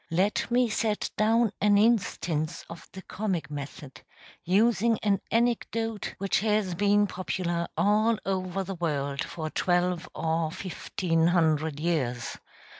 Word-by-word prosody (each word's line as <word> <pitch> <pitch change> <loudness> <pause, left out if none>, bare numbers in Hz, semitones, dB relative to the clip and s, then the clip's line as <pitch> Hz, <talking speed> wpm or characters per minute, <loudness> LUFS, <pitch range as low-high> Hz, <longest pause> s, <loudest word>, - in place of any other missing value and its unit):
Let 185 +8 +1
me 245 0 +3
set 215 -1 -1
down 225 +1 +3
an 205 0 +5
instance 180 -8 +1
of 170 - -11
the 190 - -10
comic 180 -8 -3
method, 145 -1 -8 0.4
using 225 +4 +3
an 200 -2 +2
anecdote 230 -2 -1
which 195 0 +1
has 210 -3 +1
been 205 +3 +3
popular 180 -2 -2
all 215 +2 +3
over 190 0 -2
the 195 +1 -5
world 145 -5 -2
for 155 -2 -5
twelve 180 -1 0
or 160 0 0
fifteen 165 -2 -1
hundred 160 -4 +1
years. 135 -8 -1
185 Hz, 125 wpm, -27 LUFS, 165-210 Hz, 0.4 s, an